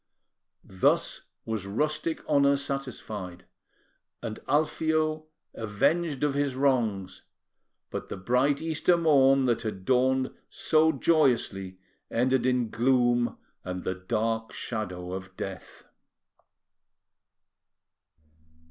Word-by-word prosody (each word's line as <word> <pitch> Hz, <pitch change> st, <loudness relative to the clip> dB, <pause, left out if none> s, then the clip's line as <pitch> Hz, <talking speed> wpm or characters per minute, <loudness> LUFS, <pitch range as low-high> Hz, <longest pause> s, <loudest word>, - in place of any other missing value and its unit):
Thus 95 Hz, -1 st, 0 dB, 0.2 s
was 110 Hz, -4 st, -3 dB
rustic 155 Hz, +9 st, -2 dB
honour 140 Hz, 0 st, +4 dB
satisfied, 110 Hz, -10 st, -5 dB, 0.8 s
and 110 Hz, -2 st, -5 dB
Alfio 155 Hz, +1 st, +1 dB, 0.3 s
avenged 140 Hz, +8 st, 0 dB
of 145 Hz, -2 st, +2 dB
his 140 Hz, -2 st, 0 dB
wrongs; 120 Hz, -9 st, 0 dB, 0.7 s
but -, -, -5 dB
the -, -, -5 dB
bright 125 Hz, +9 st, +1 dB
Easter 165 Hz, +2 st, +2 dB
morn 135 Hz, -5 st, +4 dB
that 120 Hz, -2 st, +1 dB
had 95 Hz, -4 st, -5 dB
dawned 130 Hz, +1 st, +2 dB, 0.2 s
so 160 Hz, 0 st, +3 dB
joyously 125 Hz, -, +1 dB, 0.3 s
ended 130 Hz, +1 st, +1 dB
in 125 Hz, -3 st, +1 dB
gloom 120 Hz, -1 st, +2 dB, 0.3 s
and 90 Hz, 0 st, -5 dB
the 95 Hz, -, -1 dB
dark 110 Hz, +4 st, -2 dB
shadow 90 Hz, -6 st, -4 dB
of 95 Hz, 0 st, -7 dB
death! 95 Hz, -1 st, -7 dB
125 Hz, 95 wpm, -27 LUFS, 105-145 Hz, 0.8 s, honour